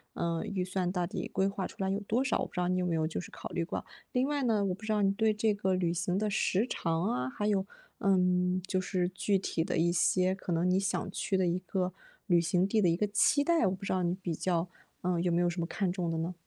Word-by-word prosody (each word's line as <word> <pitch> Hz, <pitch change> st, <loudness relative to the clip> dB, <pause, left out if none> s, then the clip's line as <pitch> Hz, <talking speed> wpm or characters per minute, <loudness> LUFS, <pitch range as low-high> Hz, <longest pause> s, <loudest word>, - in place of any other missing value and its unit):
嗯， 170 Hz, -1 st, -1 dB
预 185 Hz, -2 st, -2 dB
算 185 Hz, -1 st, -1 dB
到 180 Hz, -2 st, -1 dB
底 -, -, -4 dB
规 190 Hz, 0 st, +1 dB
划 195 Hz, -1 st, -3 dB
出 -, -, -10 dB
来 190 Hz, -, +1 dB
有 195 Hz, +1 st, 0 dB
多 220 Hz, +5 st, 0 dB
少， 265 Hz, -, +1 dB
我 -, -, 0 dB
不 -, -, -12 dB
知 180 Hz, -, -3 dB
道 180 Hz, -, +1 dB
你 185 Hz, 0 st, +1 dB
有 180 Hz, -, 0 dB
没 175 Hz, -, 0 dB
有 160 Hz, -1 st, +1 dB
就 165 Hz, -, -3 dB
是 -, -, -11 dB
考 -, -, -7 dB
虑 175 Hz, -, -1 dB
过。 165 Hz, -, -4 dB, 0.3 s
另 255 Hz, +2 st, +1 dB
外 290 Hz, -2 st, 0 dB
呢， 215 Hz, -4 st, +2 dB
我 185 Hz, -, 0 dB
不 210 Hz, -, -18 dB
知 220 Hz, -, -2 dB
道 210 Hz, -1 st, +2 dB
你 195 Hz, -1 st, +4 dB
对 215 Hz, +1 st, +2 dB
这 210 Hz, 0 st, +1 dB
个 190 Hz, -2 st, 0 dB
旅 175 Hz, -2 st, 0 dB
行 180 Hz, +2 st, -1 dB
的 215 Hz, +1 st, 0 dB
时 200 Hz, +2 st, +1 dB
长 165 Hz, -4 st, -1 dB
啊， 125 Hz, +1 st, -1 dB
还 205 Hz, +10 st, -2 dB
有， 200 Hz, -2 st, +1 dB, 0.3 s
嗯， 180 Hz, -1 st, +2 dB
就 185 Hz, -, 0 dB
是 185 Hz, -1 st, -1 dB
具 195 Hz, +1 st, +1 dB
体 175 Hz, -3 st, -2 dB
的 -, -, -1 dB
一 170 Hz, +1 st, +3 dB
些 185 Hz, +1 st, +2 dB
可 185 Hz, -2 st, -4 dB
能 170 Hz, +2 st, +1 dB
你 185 Hz, -, +3 dB
想 195 Hz, 0 st, -2 dB
去 195 Hz, -, -1 dB
的 190 Hz, -1 st, +2 dB
一 175 Hz, +1 st, +1 dB
个， 185 Hz, 0 st, -2 dB, 0.4 s
旅 175 Hz, -2 st, +5 dB
行 175 Hz, +2 st, +2 dB
地 215 Hz, +2 st, +2 dB
的 180 Hz, -, +4 dB
一 165 Hz, -, +3 dB
个 210 Hz, -, +1 dB
期 250 Hz, +7 st, +3 dB
待， 330 Hz, -, +3 dB
我 185 Hz, -, 0 dB
不 190 Hz, -, -14 dB
知 -, -, -2 dB
道 185 Hz, -1 st, +1 dB
你 175 Hz, +1 st, +1 dB
比 180 Hz, -3 st, -4 dB
较， 175 Hz, +1 st, -1 dB, 0.3 s
嗯， 175 Hz, -1 st, 0 dB
有 175 Hz, -1 st, +1 dB
没 175 Hz, -, +3 dB
有 175 Hz, -, +3 dB
什 175 Hz, +1 st, -4 dB
么 165 Hz, -, -1 dB
看 190 Hz, -2 st, -1 dB
重 180 Hz, -2 st, -2 dB
的 165 Hz, -, -1 dB
呢？ 165 Hz, +3 st, -2 dB
185 Hz, 310 characters per minute, -31 LUFS, 175-200 Hz, 0.4 s, 旅